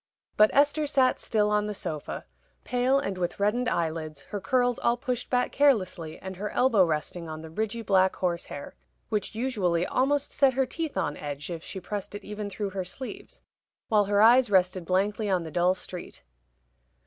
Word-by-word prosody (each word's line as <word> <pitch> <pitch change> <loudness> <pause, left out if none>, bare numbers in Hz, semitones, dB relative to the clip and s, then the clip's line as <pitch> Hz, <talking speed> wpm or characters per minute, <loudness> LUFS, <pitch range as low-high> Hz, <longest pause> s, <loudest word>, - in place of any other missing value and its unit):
But 215 0 +6
Esther 290 +2 +3
sat 265 -3 +3
still 210 -1 +1
on 210 0 +2
the 210 - -4
sofa 155 -5 -5 0.4
pale 250 +2 +2
and 195 -10 -2
with 175 +1 -2
reddened 230 +5 +1
eyelids, 160 - -2
her 205 -2 -3
curls 245 +4 +1
all 235 0 +2
pushed 250 -2 -3
back 250 -1 +1
carelessly, 190 - +1
and 190 -1 -8
her 210 +2 -3
elbow 230 -6 +4
resting 165 +1 -2
on 155 0 -7
the 160 - -9
ridgy 220 +5 -3
black 190 -2 +3
horsehair, 170 -5 -3 0.4
which 215 -1 -2
usually 200 -9 0
almost 280 +5 +1
set 275 -2 +3
her 265 0 +2
teeth 320 +3 -4
on 145 - -1
edge 145 +2 -5
if 165 -1 -5
she 190 - -6
pressed 205 +2 -5
it 205 - -7
even 210 0 -5
through 200 0 -4
her 190 -1 -3
sleeve 375 - -8 0.5
while 210 -3 +4
her 205 +1 +3
eyes 245 +1 +6
rested 185 -2 +2
blankly 205 +4 0
on 185 -3 +1
the 160 - -7
dull 180 +3 +2
street. 180 - -9
205 Hz, 185 wpm, -27 LUFS, 180-245 Hz, 0.5 s, But